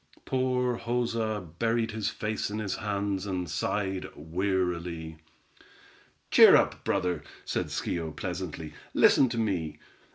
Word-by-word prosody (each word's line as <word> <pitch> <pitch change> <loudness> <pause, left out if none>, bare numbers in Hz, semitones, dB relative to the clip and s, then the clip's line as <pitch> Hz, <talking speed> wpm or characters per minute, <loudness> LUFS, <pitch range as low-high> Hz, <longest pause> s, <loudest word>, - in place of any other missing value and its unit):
Poor 125 -2 0
Joza 115 -4 -1
buried 115 0 +1
his 110 -1 -1
face 110 -1 -2
in 105 - -4
his 105 -3 -2
hands 100 -2 -2
and 90 -2 -2
sighed 95 +3 -1
wearily. 85 -1 -2 1.1
"Cheer - - +9
up, - - +2
brother," 90 -1 0 0.2
said - - -1
Schio, 85 -2 -2
pleasantly. 75 +1 -5 0.2
"Listen 130 - +6
to 115 - -3
me. 95 -9 -1
100 Hz, 120 wpm, -29 LUFS, 90-115 Hz, 1.1 s, Cheer